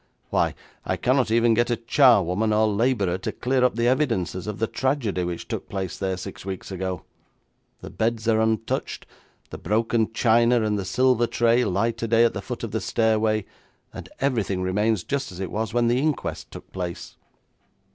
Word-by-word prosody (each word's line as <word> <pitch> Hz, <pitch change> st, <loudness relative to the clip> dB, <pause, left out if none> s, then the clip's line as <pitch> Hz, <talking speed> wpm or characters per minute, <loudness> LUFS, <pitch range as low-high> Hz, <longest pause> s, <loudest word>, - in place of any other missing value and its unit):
Why, -, -, +1 dB, 0.3 s
I -, -, -2 dB
cannot 130 Hz, -1 st, +1 dB
even 115 Hz, +1 st, +3 dB
get 120 Hz, +2 st, +1 dB
a 120 Hz, -, +2 dB
charwoman 110 Hz, -, +3 dB
or 110 Hz, +1 st, +3 dB
labourer 100 Hz, -4 st, +1 dB
to -, -, -3 dB
clear 130 Hz, 0 st, 0 dB
up 125 Hz, -, +2 dB
the 115 Hz, +1 st, +1 dB
evidences 115 Hz, -, 0 dB
of 105 Hz, -1 st, -4 dB
the 115 Hz, -, 0 dB
tragedy 120 Hz, -7 st, -1 dB
which 85 Hz, -1 st, -5 dB
took -, -, -5 dB
place 95 Hz, -2 st, -4 dB
there 95 Hz, -1 st, -2 dB
six 90 Hz, -, -8 dB
weeks 95 Hz, 0 st, -6 dB
ago. 95 Hz, -1 st, -4 dB, 0.8 s
The -, -, -9 dB
beds 115 Hz, 0 st, -1 dB
are 110 Hz, -1 st, +3 dB
untouched, 110 Hz, 0 st, -1 dB, 0.5 s
the -, -, -7 dB
broken 110 Hz, +3 st, 0 dB
china 115 Hz, +1 st, +3 dB
and 105 Hz, -1 st, 0 dB
the 95 Hz, -, -4 dB
silver 120 Hz, +4 st, +2 dB
tray 120 Hz, +1 st, +2 dB
lie 100 Hz, +5 st, +1 dB
today 115 Hz, 0 st, +2 dB
at 115 Hz, -, +1 dB
the -, -, -4 dB
foot -, -, -6 dB
of -, -, -4 dB
the -, -, -2 dB
stairway, 110 Hz, -2 st, +1 dB, 0.5 s
and -, -, -9 dB
everything 110 Hz, -9 st, 0 dB
remains 105 Hz, +1 st, 0 dB
just 140 Hz, -5 st, -3 dB
as 90 Hz, -, -10 dB
it 95 Hz, -, -4 dB
was 110 Hz, +1 st, -2 dB
when 120 Hz, 0 st, +2 dB
the 120 Hz, +2 st, +2 dB
inquest 150 Hz, 0 st, -2 dB
took -, -, -12 dB
place.' 90 Hz, -2 st, -6 dB
110 Hz, 185 wpm, -24 LUFS, 95-120 Hz, 0.8 s, even